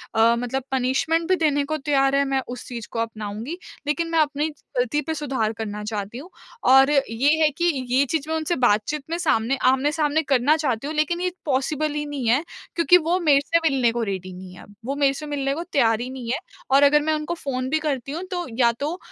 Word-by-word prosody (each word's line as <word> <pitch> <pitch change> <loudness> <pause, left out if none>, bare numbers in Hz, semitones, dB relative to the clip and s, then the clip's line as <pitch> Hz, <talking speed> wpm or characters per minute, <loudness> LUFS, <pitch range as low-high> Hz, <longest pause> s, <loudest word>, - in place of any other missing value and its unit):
अ, 225 +1 +5
मतलब 245 +2 -3
पनिशमेंट 265 +6 +1
भी 375 - +5
देने 295 -4 +1
को 310 +2 -2
तैयार 275 -2 +2
हैं, 280 0 +3
मैं 270 -1 0
उस 245 0 -7
चीज़ 235 -3 -7
को 230 - -3
अपनाऊँगी। 225 +6 -4 0.3
लेकिन 330 +3 0
मैं 330 - +2
अपनी 295 0 +1 0.3
गलती 250 +4 +1
पे 320 +3 -3
सुधार 270 -8 -2
करना 210 -1 -5
चाहती 210 +1 -4
हूँ। 305 +8 -9 0.4
और 270 +1 +6 0.2
ये 245 +6 +2
है 310 - +5
कि 345 - 0 0.2
ये 260 +3 +3
चीज़ 310 -2 -1
मैं 320 - 0
उनसे 320 +2 -1
बातचीत 250 +4 +1
में 335 - -1
सामने 270 -7 +1
आमने-सामने 295 +3 +1
करना 275 +1 +3
चाहती 275 -4 -1
हूँ। 310 - -4
लेकिन 310 +3 0
ये 365 0 0
पॉसिबल 295 +2 0
ही 295 0 -3
नहीं 285 -5 -4
है 260 +7 +3 0.3
क्योंकि 355 +1 +6
वो 345 +2 0
मेरे 295 -5 +4
से 335 - +2
मिलने 255 -4 +2
को 235 0 -2
रेडी 190 -3 -4
नहीं 180 0 -10
है - - -12
अब। 205 - -17
वो 275 +3 -2
मेरे 280 -1 +2
से 300 +2 -7
मिलने 280 -2 -1
को 330 +4 -4
तैयार 230 -10 +2
ही 250 - -4
नहीं 255 -3 -5
है। - - 0 0.3
और 275 +1 +6
अगर 295 +1 +5
मैं 315 +1 0
उनको 305 +2 -2
फ़ोन 260 -5 -3
भी 315 +3 +1
करती 275 -4 -3
हूँ 330 +5 -4
तो 355 -1 -2
या 235 -2 +5
तो 305 +5 -2
275 Hz, 230 wpm, -23 LUFS, 245-310 Hz, 0.4 s, और